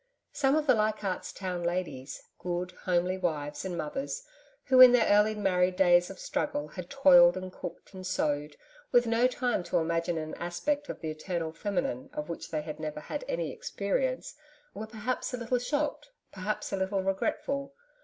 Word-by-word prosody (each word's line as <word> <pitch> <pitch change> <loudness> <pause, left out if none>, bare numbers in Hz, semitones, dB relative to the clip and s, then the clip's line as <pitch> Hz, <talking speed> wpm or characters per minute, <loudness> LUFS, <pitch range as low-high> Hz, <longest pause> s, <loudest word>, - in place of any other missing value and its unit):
Some 275 0 +2
of 310 -1 +1
the - - +6
Leichardt's 215 -3 -1
Town 180 -2 -4
ladies 170 -6 -3 0.2
good, 180 0 -3
homely 180 +1 +1
wives 150 -5 -2
and 180 -2 -4
mothers 270 - -3 0.4
who, 260 -1 +6
in 250 -1 +11
their 240 -2 +5
early 210 +1 +4
married 185 -3 +2
days 175 -2 +5
of 195 - -9
struggle, 150 -1 -2
had 180 +3 -8
toiled 265 -2 +7
and 185 0 -6
cooked 175 +3 -8
and 185 -1 -8
sewed, 150 -5 -1 0.3
with 245 0 +5
no 230 +2 +3
time 250 -4 0
to - - 0
imagine 165 +1 0
an 155 0 -4
aspect 285 +13 -2
of - - -6
the 160 -2 -3
Eternal 165 +1 -3
Feminine 260 +9 -2
of 300 0 -5
which 170 - -6
they 155 -1 -2
had 155 0 -7
never 155 -1 -4
had 150 - -5
any - - -2
experience, - - -2 0.4
were 215 +2 -6
perhaps 240 +3 -3
a - - -6
little 245 +1 0
shocked, 295 - -2 0.2
perhaps 205 +2 -3
a - - +1
little 190 0 0
regretful. 275 +8 -2
190 Hz, 175 wpm, -29 LUFS, 175-255 Hz, 0.4 s, in